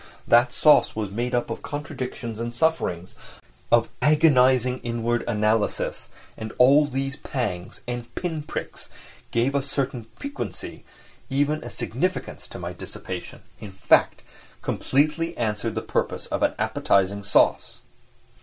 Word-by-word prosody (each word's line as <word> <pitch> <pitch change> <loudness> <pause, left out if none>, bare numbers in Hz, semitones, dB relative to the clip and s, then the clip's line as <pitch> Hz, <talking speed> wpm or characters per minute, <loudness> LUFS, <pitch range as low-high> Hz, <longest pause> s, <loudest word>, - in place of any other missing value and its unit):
That 120 +3 +5
sauce 150 - +5
was 105 -3 -3
made 120 +4 -1
up 120 - -1
of - - -5
contradictions 130 -5 -5
and 120 0 -3
sufferings, 120 - 0 0.6
of 115 -1 +5
agonising 130 -5 +4
inward 120 0 -1
analysis, 105 -1 0 0.3
and 110 0 -6
all 140 +4 +6
these 135 +1 -3
pangs 100 -12 -4
and 120 -1 -4
pin 165 -4 -3
pricks 150 - -6 0.4
gave 120 +4 +1
a 140 - +2
certain 135 -3 -2
piquancy, 285 0 -6 0.5
even 145 +3 +1
a - - -6
significance - - -3
to - - -9
my - - -5
dissipation—in 100 -2 -8
fact, 95 - +3 0.4
completely 155 +4 0
answered 110 0 -1
the 110 - -2
purpose - - -2
of - - -3
an - - +2
appetising 100 +1 +1
sauce. 100 - +2
125 Hz, 125 wpm, -24 LUFS, 110-145 Hz, 0.6 s, all